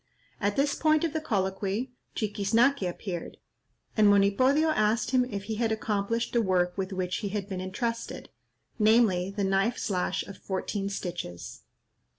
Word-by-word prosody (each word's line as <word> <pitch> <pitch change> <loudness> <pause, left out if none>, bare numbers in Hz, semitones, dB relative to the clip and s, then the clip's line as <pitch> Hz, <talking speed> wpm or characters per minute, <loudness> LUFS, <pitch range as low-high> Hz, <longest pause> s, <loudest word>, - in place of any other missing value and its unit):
At 205 0 0
this 285 +1 +2
point 310 0 +2
of 325 -3 0
the 315 - -1
colloquy, 200 +1 -1 0.2
Chiquiznaque 225 +6 +2
appeared, 175 -1 -6 0.6
and 215 -2 +5
Monipodio 230 +10 +4
asked 220 -4 +1
him 255 -1 +4
if 200 -5 -5
he 215 +1 -4
had 230 -1 +1
accomplished 220 +1 -1
the 235 - +3
work 180 -3 +1
with 195 0 -3
which 180 -1 -2
he 205 - -3
had 200 -1 -3
been 190 -3 -4
entrusted—namely, 215 -1 0
the 200 +1 -3
knife 195 +5 +1
slash 185 -5 -1
of 200 -2 -10
fourteen 195 +1 -3
stitches. 170 - -6
205 Hz, 150 wpm, -28 LUFS, 190-235 Hz, 0.6 s, and